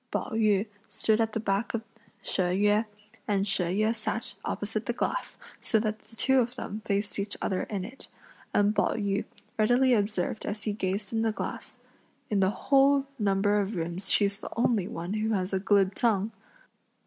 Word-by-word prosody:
Pao - - -2
yü 215 -2 +3 0.2
stood 220 0 +2
at 225 -1 0
the - - 0
back 205 +2 0
of 225 - -3 0.4
She - - -1
Yüeh, 205 +4 +2 0.4
and 200 -1 +1
She 190 -2 +1
Yüeh 215 +6 +1
sat 220 0 -2
opposite 215 +1 -2
the 240 - +1
glass, - - -2 0.2
so 225 - +2
that 215 0 -2
the 225 - -15
two 265 +3 +4
of 245 0 0
them 215 -3 -5
faced 200 0 0
each 200 +1 -3
other 185 - -1
in 195 -3 -2
it, 255 +6 -10 0.4
and 205 +1 +3
Pao 205 - +2
yü 200 -1 -1 0.3
readily 245 +4 +4
observed 210 -2 0
as 210 0 -3
he 210 - -1
gazed 200 +1 -2
in 225 - +1
the 225 -1 +2
glass, - - -5 0.5
"In 205 - +2
the 190 -1 +4
whole 275 +4 +3
number 205 0 +2
of 200 +2 -3
rooms 170 +3 -2
she's 200 -1 +2
the - - -7
only 225 -5 +2
one 175 -2 -4
who 215 +1 0
has 185 0 -2
a 190 - +2
glib 195 -1 +3
tongue!" 215 -2 +1
210 Hz, 185 wpm, -28 LUFS, 195-225 Hz, 0.5 s, two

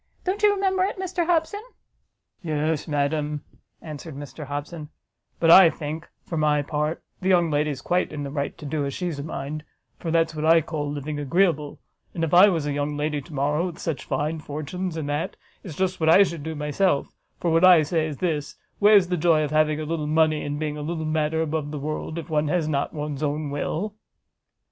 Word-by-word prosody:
Don't 385 +3 -2
you 420 -1 +6
remember 385 -2 +1
it, 390 - -1
Mr 365 -2 -2
Hobson?" 350 +4 +1 0.8
"Yes, 155 -2 -1
madam," 150 0 -1 0.4
answered 155 -1 -8
Mr 145 +2 -8
Hobson, 145 +2 -5 0.5
"but 165 -1 +5
I 185 -1 +10
think, 160 +1 -6 0.2
for 165 - -4
my 150 -1 +2
part, 150 +2 -2 0.2
the 190 - 0
young 175 -3 +4
lady's 145 -2 -1
quite 180 +1 0
in 150 -2 -5
the 140 - -5
right 140 -1 -3
to 150 - -10
do 145 0 -1
as 140 -1 -3
she's 175 -5 -3
a - - -4
mind; 150 0 -5 0.4
for 165 - -4
that's 165 0 +2
what 155 -1 -4
I 165 +1 +6
call 150 -2 -4
living 145 +1 -4
agreeable: 150 0 +1 0.4
and 165 - -2
if 165 - -1
I 185 +4 +8
was 165 -6 -1
a 145 - -1
young 145 +1 -2
lady 150 0 -1
to 145 - -14
morrow, 150 +5 +1
with 175 - -7
such 155 -6 -3
fine 150 +4 -2
fortunes, 155 +4 -5
and 155 -3 -3
that, 145 +2 -2 0.3
it's 170 -7 -8
just 185 +1 -1
what 160 -1 +2
I 190 +5 +8
should 170 -5 -4
do 160 +2 -5
myself: 150 +2 0 0.3
for 170 - 0
what 165 +2 +3
I 180 -4 +8
say 155 +1 0
is 150 -3 -6
this: 155 -5 -2 0.2
where's 205 -3 +6
the 180 - 0
joy 160 -1 +3
of 150 - -3
having 155 0 +2
a - - -3
little 155 -1 -2
money, 155 0 +2
and 145 0 -3
being 150 -1 -3
a - - -5
little 160 +1 -3
matter 155 +1 0
above 155 -1 -2
the 150 - -5
world, 155 +2 -4
if 165 - -5
one 155 -2 0
has 165 0 0
not 140 -2 -1
one's 150 -2 -5
own 150 0 -2
will?" 170 +8 -2
155 Hz, 215 wpm, -24 LUFS, 145-170 Hz, 0.8 s, I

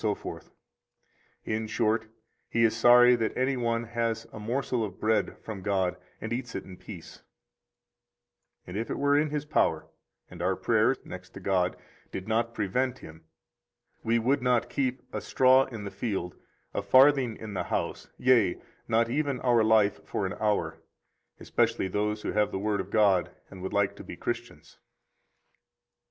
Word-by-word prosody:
81 105 -2 -3 1.0
In 110 0 -2
short, 110 +1 0 0.4
he 115 - +2
is 115 0 +3
sorry 120 +1 +7
that 115 -1 -2
any 130 +1 +1
one 115 -1 0
has 115 -1 -2
a - - -7
morsel 120 +2 -1
of 95 -4 -6
bread 110 0 +1
from 105 -4 -6
God 95 -2 0 0.2
and 110 +2 -4
eats 120 -1 -4
it - - -3
in 95 - -11
peace; 90 -3 -11 1.4
and 90 - -8
if 110 +3 -3
it - - -2
were 145 0 +3
in 150 +1 +2
his 150 0 -3
power, 150 - +1 0.4
and 90 -1 -10
our 95 +2 +1
prayer 115 +5 +2
(next 90 0 -10
to - - -7
God) 90 -1 0 0.3
did 95 - -6
not 115 +1 0
prevent 125 +6 -1
him, 80 -5 -13 0.8
we 115 +1 +2
would 130 +4 +1
not 125 -2 +1
keep 130 -2 -1
a - - -3
straw 130 +1 +4
in 115 -5 -8
the 100 - -6
field, 95 -3 -3 0.4
a - - -1
farthing 130 +2 +5
in 110 -2 -8
the 95 - -2
house, - - -3
yea, 120 -8 +3 0.3
not 115 +1 +2
even 140 +1 -1
our 120 -3 +3
life 110 -2 +3
for 100 - -3
an 95 - -3
hour, 105 -1 0 0.6
especially - - 0
those 105 +2 -2
who - - -2
have 105 0 +1
the - - -2
Word 100 0 0
of 95 - -9
God 100 -4 +3 0.2
and 95 - -10
would 95 - -4
like 100 -1 +1
to - - -9
be - - -9
Christians. - - -6
110 Hz, 170 wpm, -28 LUFS, 100-125 Hz, 1.4 s, sorry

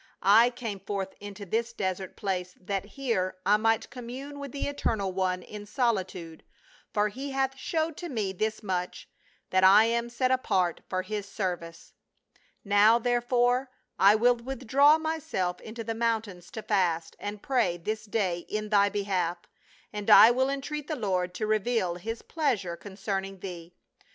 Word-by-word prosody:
I 220 +5 +7
came 235 -5 -5
forth 195 0 -4
into 205 0 -8
this 230 +4 -1
desert 190 -3 -3
place 180 -2 -3
that 195 +1 -3
here 200 -9 -1
I 205 +1 +5
might 225 +1 +1
commune 265 +3 -7
with 280 -2 -6
the 280 - -3
Eternal 220 -9 -1
One 185 -1 -1
in 205 -1 -9
solitude, 190 - -2 0.5
for 210 +1 +1
he 270 +7 -6
hath 270 0 0
showed 315 +3 -2
to 350 - -6
me 210 -8 -2
this 215 +3 -2
much, 180 -3 -3 0.4
that 185 0 +3
I 200 +4 +8
am 235 +1 0
set 255 +2 0
apart 190 -9 +1
for 185 0 -1
his 210 -1 -4
service. 175 -5 -5 0.7
Now, 205 +3 +6
therefore, 245 +2 +1 0.3
I 200 +2 +7
will 240 +2 +4
withdraw 270 +4 +3
myself 310 - -2
into 230 +1 -7
the 225 +1 -3
mountains 225 -6 -2
to 220 - -6
fast 170 -5 0
and 205 0 -6
pray 240 -10 +1
this 215 +5 -4
day 195 -5 0
in 215 0 -3
thy 200 -1 +4
behalf, 190 -4 -1 0.6
and 210 -1 -4
I 225 - +10
will 260 +2 +1
entreat 280 +2 -4
the 310 - -2
Lord 185 -6 -1
to 215 - -2
reveal 215 -3 +1
his 225 +6 -6
pleasure 225 - -1
con 200 +3 -11
cerning 195 -1 -3
thee. 175 -2 -8
210 Hz, 160 wpm, -28 LUFS, 190-240 Hz, 0.7 s, I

